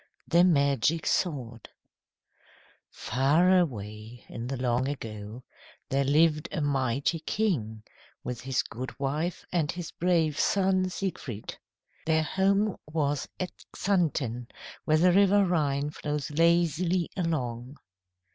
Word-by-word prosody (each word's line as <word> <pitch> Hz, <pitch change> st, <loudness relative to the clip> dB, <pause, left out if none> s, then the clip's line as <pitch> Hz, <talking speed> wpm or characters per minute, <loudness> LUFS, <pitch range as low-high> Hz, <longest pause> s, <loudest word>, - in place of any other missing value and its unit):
THE 170 Hz, +1 st, +5 dB
MAGIC 150 Hz, -1 st, +2 dB
SWORD 125 Hz, -, -2 dB, 1.2 s
FAR 150 Hz, +10 st, +2 dB
away 110 Hz, -, -4 dB
in 120 Hz, +1 st, -6 dB
the 135 Hz, +1 st, -3 dB
long 125 Hz, +1 st, 0 dB
ago 110 Hz, -3 st, -6 dB, 0.5 s
there 135 Hz, +1 st, +1 dB
lived 150 Hz, +2 st, +3 dB
a -, -, -2 dB
mighty 140 Hz, +2 st, 0 dB
king 150 Hz, -, -2 dB, 0.4 s
with 125 Hz, -1 st, -5 dB
his 130 Hz, -1 st, 0 dB
goodwife 140 Hz, +7 st, -4 dB
and 160 Hz, -4 st, +1 dB
his 175 Hz, -1 st, -6 dB
brave 165 Hz, -4 st, +1 dB
son, 190 Hz, -1 st, +2 dB
Siegfried. 165 Hz, -, -5 dB, 0.5 s
Their 160 Hz, -1 st, +3 dB
home 195 Hz, +5 st, +1 dB
was 145 Hz, -3 st, -1 dB
at 180 Hz, -1 st, -3 dB, 0.3 s
Xanten, 145 Hz, -, 0 dB, 0.4 s
where 155 Hz, -, +3 dB
the 180 Hz, +3 st, +5 dB
river 200 Hz, +1 st, +5 dB
Rhine 145 Hz, -5 st, 0 dB
flows 150 Hz, -1 st, -4 dB
lazily 170 Hz, +2 st, +2 dB
along. 130 Hz, -7 st, -3 dB
150 Hz, 110 wpm, -28 LUFS, 130-175 Hz, 1.2 s, THE